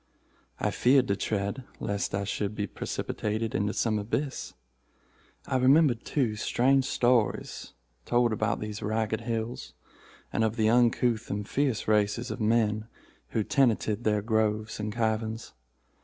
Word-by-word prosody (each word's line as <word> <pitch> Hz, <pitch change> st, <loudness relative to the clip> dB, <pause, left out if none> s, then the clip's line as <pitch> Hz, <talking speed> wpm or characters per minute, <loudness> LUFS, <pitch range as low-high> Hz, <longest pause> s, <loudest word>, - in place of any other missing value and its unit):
I -, -, 0 dB
feared 130 Hz, 0 st, +4 dB
to 100 Hz, -, +2 dB
tread, 100 Hz, +5 st, -2 dB, 0.2 s
lest 100 Hz, -1 st, -2 dB
I 100 Hz, -, -1 dB
should 100 Hz, +1 st, -2 dB
be 105 Hz, -, -1 dB
precipitated 110 Hz, +3 st, -3 dB
into 105 Hz, -6 st, 0 dB
some 110 Hz, -1 st, 0 dB
abyss. 130 Hz, +7 st, -3 dB, 0.9 s
I 130 Hz, -, 0 dB
remembered, 130 Hz, -1 st, +4 dB
too, 125 Hz, -7 st, 0 dB
strange 130 Hz, +5 st, +2 dB
stories 120 Hz, -4 st, 0 dB, 0.3 s
told 120 Hz, -, +2 dB
about 110 Hz, -1 st, 0 dB
these 105 Hz, 0 st, -5 dB
Ragged 110 Hz, +1 st, -1 dB
Hills, 115 Hz, 0 st, -4 dB, 0.6 s
and 110 Hz, -, +1 dB
of 110 Hz, 0 st, 0 dB
the 110 Hz, -2 st, +2 dB
uncouth 120 Hz, -1 st, +2 dB
and 100 Hz, 0 st, -3 dB
fierce 135 Hz, -6 st, 0 dB
races 105 Hz, +3 st, +1 dB
of 120 Hz, -, -5 dB
men 110 Hz, -1 st, +1 dB, 0.4 s
who 110 Hz, -, -1 dB
tenanted 115 Hz, -3 st, +1 dB
their 105 Hz, -2 st, +1 dB
groves 110 Hz, -1 st, 0 dB
and 105 Hz, 0 st, -2 dB
caverns. 110 Hz, 0 st, -2 dB
110 Hz, 140 wpm, -28 LUFS, 105-120 Hz, 0.9 s, feared